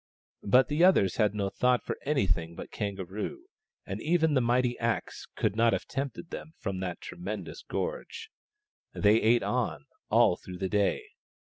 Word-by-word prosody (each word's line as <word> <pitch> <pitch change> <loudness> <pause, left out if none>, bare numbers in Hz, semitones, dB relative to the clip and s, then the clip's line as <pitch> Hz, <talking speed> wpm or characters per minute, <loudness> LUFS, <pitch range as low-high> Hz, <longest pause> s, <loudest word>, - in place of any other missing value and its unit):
But 125 +6 +4
the 150 +3 +1
others 180 - +4
had 105 -2 +2
no 100 -2 -1
thought 125 -1 +2
for - - -3
anything 90 - 0
but - - -8
Kangaroo, 100 - -4 0.4
and - - -5
even 160 -1 +2
the 130 - +3
mighty 120 +1 +2
axe 115 -1 -2
could - - 0
not 115 +1 +4
have - - -1
tempted 140 +5 -5
them 160 - -8
from 95 -1 -4
that 90 -2 -4
tremendous 100 +5 -6
gorge. 465 -2 -5 0.6
They 105 +2 +4
ate 115 +2 +4
on, - - -1 0.2
all - - +4
through 90 -1 -9
the 95 0 -2
day. 105 - +1
115 Hz, 160 wpm, -29 LUFS, 100-145 Hz, 0.6 s, But